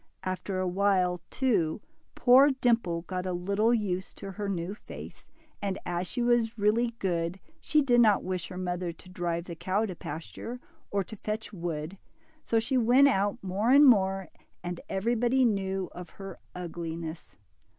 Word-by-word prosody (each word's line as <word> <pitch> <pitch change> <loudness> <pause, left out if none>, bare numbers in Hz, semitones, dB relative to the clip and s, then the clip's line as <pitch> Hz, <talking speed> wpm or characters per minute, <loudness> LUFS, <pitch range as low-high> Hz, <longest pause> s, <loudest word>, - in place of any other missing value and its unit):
After 185 +1 -3
a 185 0 0
while, 180 -2 +2
too, 215 -12 +1 0.4
poor 260 +4 +7
Dimple 235 -11 +1
got 185 +1 -4
a 180 - -1
little 200 +6 +1
used 195 -5 -1
to 195 - -7
her 200 +1 -4
new 180 0 -2
face, 210 - -11 0.3
and 195 -2 -1
as 175 +1 -2
she 245 +4 -2
was 240 -1 +2
really 225 +3 +2
good, 175 -2 -1 0.2
she 305 -2 +2
did 240 -3 +5
not 210 -4 +4
wish 185 -2 -3
her 180 - -8
mother 180 -1 -2
to 175 +2 -16
drive 175 -2 -2
the 175 - -6
cow 190 +6 0
to 185 -4 -5
pasture, 165 +11 -7 0.3
or 200 -1 0
to 220 - -10
fetch 215 +2 -4
wood, 170 0 -4 0.4
so 225 - +2
she 250 +3 +1
went 250 +4 +6
out 205 -3 +1
more 195 +5 0
and 280 +3 +8
more, 195 -6 +4 0.3
and 175 0 -4
everybody 240 +6 +2
knew 195 -4 0
of 180 0 -9
her 195 -2 -9 0.2
ugliness. 165 -2 -6
195 Hz, 165 wpm, -29 LUFS, 180-230 Hz, 0.4 s, and